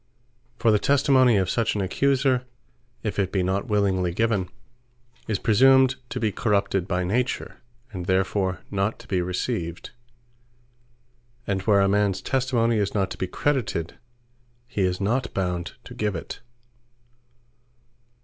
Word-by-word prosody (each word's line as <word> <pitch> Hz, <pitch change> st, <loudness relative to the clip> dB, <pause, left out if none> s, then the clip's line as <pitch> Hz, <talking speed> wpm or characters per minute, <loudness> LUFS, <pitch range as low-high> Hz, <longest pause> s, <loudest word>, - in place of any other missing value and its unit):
For 115 Hz, -2 st, +3 dB
the 105 Hz, -, +3 dB
Testimony 130 Hz, -3 st, +4 dB
of 95 Hz, -2 st, +1 dB
such 115 Hz, +4 st, 0 dB
an 105 Hz, -, -1 dB
Accuser, 130 Hz, +5 st, +1 dB, 0.6 s
if 105 Hz, -2 st, -3 dB
it 95 Hz, -1 st, 0 dB
be 95 Hz, -2 st, 0 dB
not 95 Hz, +2 st, -1 dB
willingly 95 Hz, -4 st, +1 dB
given, 100 Hz, -1 st, 0 dB, 0.8 s
is 110 Hz, -3 st, 0 dB
praesumed 130 Hz, +5 st, +5 dB, 0.2 s
to -, -, -4 dB
be 110 Hz, -2 st, 0 dB
corrupted 100 Hz, -4 st, 0 dB
by 90 Hz, -1 st, 0 dB
Nature; 120 Hz, +8 st, -2 dB, 0.3 s
and 90 Hz, -2 st, -6 dB
therefore 95 Hz, 0 st, 0 dB
not 100 Hz, +2 st, -1 dB
to -, -, -17 dB
be 95 Hz, -3 st, 0 dB
received: 90 Hz, -1 st, -3 dB, 1.5 s
and 95 Hz, -1 st, -1 dB
where 100 Hz, -2 st, +5 dB
a 100 Hz, -, +3 dB
mans 100 Hz, -1 st, +1 dB
Testimony 125 Hz, -4 st, +1 dB
is 100 Hz, -1 st, -1 dB
not 95 Hz, -2 st, 0 dB
to -, -, -6 dB
be 95 Hz, -, -1 dB
credited, 115 Hz, -, -2 dB, 0.7 s
his 95 Hz, -6 st, -1 dB
not 115 Hz, +7 st, 0 dB
bound 90 Hz, -2 st, -2 dB
to -, -, -11 dB
give 105 Hz, -2 st, -2 dB
it. 80 Hz, -, -6 dB
100 Hz, 140 wpm, -24 LUFS, 95-115 Hz, 1.5 s, praesumed